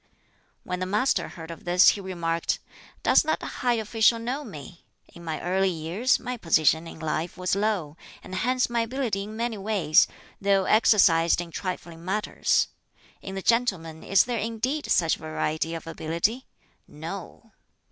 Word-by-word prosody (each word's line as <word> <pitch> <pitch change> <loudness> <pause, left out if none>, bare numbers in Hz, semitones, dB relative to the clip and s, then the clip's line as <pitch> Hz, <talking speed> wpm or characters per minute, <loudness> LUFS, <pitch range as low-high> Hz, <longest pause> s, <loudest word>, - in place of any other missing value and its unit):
When 180 0 -4
the 185 - -2
Master 210 +7 +1
heard 165 -1 -9
of 165 - -10
this 180 +2 +6
he 205 - 0
remarked, 170 -3 -1 0.5
"Does - - +5
that 315 0 -1
high 245 -1 0
official 225 +1 +3
know 250 +6 -3
me? 170 - -11 0.3
In 170 - -12
my 160 -2 -3
early 190 +2 +1
years 175 +9 0
my 250 0 -5
position 160 -3 +2
in - - -10
life 160 +2 -3
was 180 +1 0
low, 200 -7 -1 0.3
and 185 - -10
hence 250 +6 +1
my 240 -1 -1
ability 230 -3 -1
in 215 +1 -8
many 230 -2 -2
ways, 195 -7 +3 0.3
though 195 -1 +3
exercised 180 -7 +4
in 175 -1 -5
trifling 170 -2 -5
matters. 200 +4 +1 0.5
In 190 - -7
the 195 - -5
gentleman 190 -10 0
is 195 0 +4
there 240 -2 -2
indeed 230 +7 -2
such 165 -2 +3
variety 155 +1 -2
of 165 - -7
ability? 170 +10 -2 0.4
No." - - -8
190 Hz, 155 wpm, -26 LUFS, 165-225 Hz, 0.5 s, this